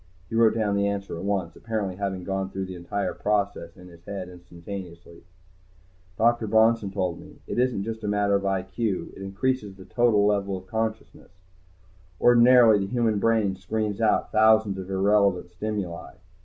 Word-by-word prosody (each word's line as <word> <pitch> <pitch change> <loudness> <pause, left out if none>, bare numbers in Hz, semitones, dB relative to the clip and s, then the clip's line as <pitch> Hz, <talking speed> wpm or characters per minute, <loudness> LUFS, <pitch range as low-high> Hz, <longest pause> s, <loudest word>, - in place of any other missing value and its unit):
He - - -5
wrote 115 -1 +4
down 105 -3 0
the 100 0 +1
answer 100 -3 -3
at 85 - -7
once, 95 -4 -2
apparently 105 -5 -4
having 95 -2 -3
gone 95 +1 -3
through 95 0 -4
the 95 - -8
entire 90 +2 -3
process 100 -5 -2
in 90 - -13
his 85 -1 -16
head 95 -3 -6
instantaneously. 85 -1 -10 1.0
Dr. 115 0 +2
Bronson 110 -1 +3
told 90 -3 -2
me, - - -14
"It - - -3
isn't 125 -6 +1
just 110 +1 -6
a - - -3
matter 105 0 +1
of 100 0 +1
I.Q. 95 +1 -2
It - - -11
increases 100 +2 -2
the 95 -1 -13
total 110 -1 +2
level 100 -2 0
of 95 - -11
consciousness. 110 -3 -5 0.9
Ordinarily 120 -2 +6
the 95 - -2
human 115 -4 +1
brain 110 -3 +1
screens 105 +2 -3
out 110 - +1
thousands 110 -2 +4
of 95 0 -7
irrelevant 95 -2 +2
stimuli. 95 -2 -5
100 Hz, 170 wpm, -25 LUFS, 95-110 Hz, 1.0 s, Ordinarily